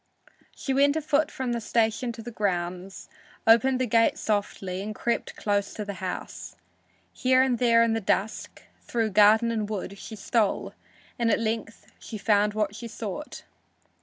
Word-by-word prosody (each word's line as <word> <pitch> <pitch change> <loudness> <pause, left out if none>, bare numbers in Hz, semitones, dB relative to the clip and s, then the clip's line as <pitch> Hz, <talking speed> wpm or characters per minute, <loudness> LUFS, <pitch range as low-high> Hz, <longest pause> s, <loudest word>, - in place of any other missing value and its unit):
She 270 - -3
went 285 +2 +4
afoot 310 -1 +1
from 260 -2 -3
the 235 - -2
station 225 +1 0
to 225 0 -9
the 240 - -7
grounds, 185 -2 -3 0.4
opened 245 +3 +5
the 255 - +1
gate 230 0 +3
softly 200 -3 -2
and 210 +1 -5
crept 235 - -2
close 205 -1 -1
to 210 - -4
the 200 - -4
house. 185 -1 -6 0.6
Here 255 0 +3
and 250 -3 0
there 230 -2 +5
in 230 -1 +2
the 225 - -1
dusk, 205 +2 -2 0.2
through 225 -2 -1
garden 215 +3 +5
and 215 -2 -2
wood, 200 -1 -5
she 220 - -8
stole, 215 0 0 0.5
and 235 -1 +2
at - - +3
length 225 0 -3
she 220 - -7
found 210 0 +2
what 210 -1 -1
she 230 +2 -7
sought. 225 +6 -6
220 Hz, 165 wpm, -26 LUFS, 205-235 Hz, 0.6 s, opened